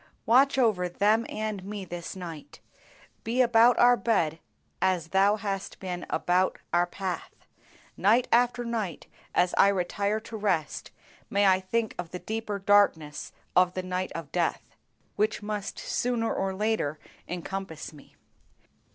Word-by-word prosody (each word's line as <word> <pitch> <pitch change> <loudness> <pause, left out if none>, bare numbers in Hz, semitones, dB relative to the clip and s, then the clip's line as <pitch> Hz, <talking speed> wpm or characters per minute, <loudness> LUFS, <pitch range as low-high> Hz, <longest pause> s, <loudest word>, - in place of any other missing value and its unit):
Watch 270 +4 +5
over 210 -8 +2
them 210 +5 +2
and 215 -3 -4
me 200 0 -6
this 175 +1 -6
night; 170 -5 -9 0.6
be 235 +3 -2
about 240 -1 +5
our 245 0 +6
bed 190 -8 0 0.4
as 180 -4 +1
Thou 195 +3 +4
hast 200 -2 -4
been 180 -2 -5
about 180 +1 +1 0.2
our 175 0 +3
path. 185 0 -6 0.5
Night 230 +5 +3
after 245 0 +3
night 220 -8 -3 0.3
as 180 0 +3
I - - +8
retire 200 +2 0
to 225 +1 -9
rest 185 -8 -1 0.4
may 200 0 +2
I 190 -1 +5
think 220 +4 -1
of 175 -2 -4
the 180 - -5
deeper 220 +1 -4
darkness 195 -7 +2 0.2
of 180 0 +4
the 185 - -2
night 185 0 -3
of 165 -3 -7
death, 175 -2 -1 0.5
which 210 0 0
must, 210 -1 -4
sooner 235 -2 -1
or 190 0 -2
later 210 -8 0 0.3
encompass 180 -2 -5
me. 145 - -17
195 Hz, 145 wpm, -27 LUFS, 180-220 Hz, 0.6 s, I